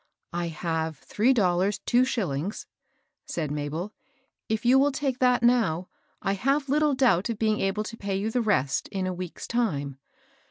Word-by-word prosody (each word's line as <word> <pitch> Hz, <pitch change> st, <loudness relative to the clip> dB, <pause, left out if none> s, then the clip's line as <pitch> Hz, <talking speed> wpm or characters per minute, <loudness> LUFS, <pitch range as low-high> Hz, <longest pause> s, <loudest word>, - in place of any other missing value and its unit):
^ -, -, -42 dB, 0.3 s
"I 175 Hz, 0 st, -1 dB
have 160 Hz, -1 st, -2 dB
three 220 Hz, -, +1 dB
dollars, 190 Hz, -4 st, +2 dB
two 245 Hz, +1 st, +4 dB
shillings," 190 Hz, -, -2 dB, 0.6 s
said 155 Hz, -4 st, -3 dB
Ma 145 Hz, 0 st, -2 dB
bel. 175 Hz, +8 st, -4 dB, 0.3 s
" 265 Hz, -, -48 dB
If 220 Hz, +2 st, -1 dB
you 255 Hz, +2 st, +6 dB
will 285 Hz, +1 st, +3 dB
take 270 Hz, -2 st, -2 dB
that 250 Hz, -2 st, +3 dB
now, 220 Hz, -8 st, +2 dB, 0.3 s
I 195 Hz, -, +1 dB
have 275 Hz, +7 st, 0 dB
little 300 Hz, 0 st, +3 dB
doubt 245 Hz, -7 st, +3 dB
of 230 Hz, -, -2 dB
being 215 Hz, 0 st, +1 dB
able 195 Hz, +2 st, 0 dB
to 230 Hz, +2 st, -8 dB
pay 200 Hz, -2 st, -3 dB
you 205 Hz, +3 st, -1 dB
the 245 Hz, -, +1 dB
rest 190 Hz, -, +1 dB
in 190 Hz, -2 st, -3 dB
a 185 Hz, -, -1 dB
week's 180 Hz, -1 st, -6 dB
time." 145 Hz, -, -1 dB
205 Hz, 190 wpm, -26 LUFS, 175-245 Hz, 0.6 s, you